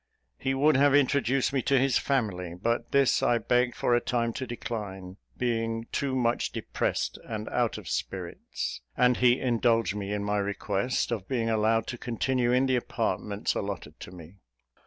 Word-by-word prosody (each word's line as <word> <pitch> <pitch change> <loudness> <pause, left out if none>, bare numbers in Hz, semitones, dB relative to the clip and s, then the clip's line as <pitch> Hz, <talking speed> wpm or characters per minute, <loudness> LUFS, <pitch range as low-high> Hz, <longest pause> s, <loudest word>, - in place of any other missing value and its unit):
He 135 0 0
would 145 +1 +4
have 140 0 +5
introduced 135 -1 +2
me 135 - +1
to 140 +2 +2
his 130 -1 +3
family; 90 -10 -1
but 115 +4 -1
this 140 -2 +3
I 120 - +3
begged, 125 +2 +1
for 120 - +1
a 120 - +3
time, 115 -2 -1
to 130 +2 -4
decline, 100 -6 -6 0.2
being 115 -2 -1
too 135 -2 -1
much 120 -2 +1
depressed - - -2
and 110 -1 -5
out 120 -2 0
of - - -10
spirits; - - -4 0.2
and 125 0 +4
he 125 0 +4
indulged 115 -3 +2
me 100 -1 -4
in 105 0 -2
my 105 0 0
request 100 +4 -1
of 105 -5 -3
being 115 -4 0
allowed 110 0 +2
to 120 - -6
continue 120 +1 0
in 125 +2 +3
the 130 -1 +2
apartments 105 -3 -2
allotted 95 -6 -5
to - - -9
me. 90 +1 -12
115 Hz, 175 wpm, -28 LUFS, 105-125 Hz, 0.2 s, have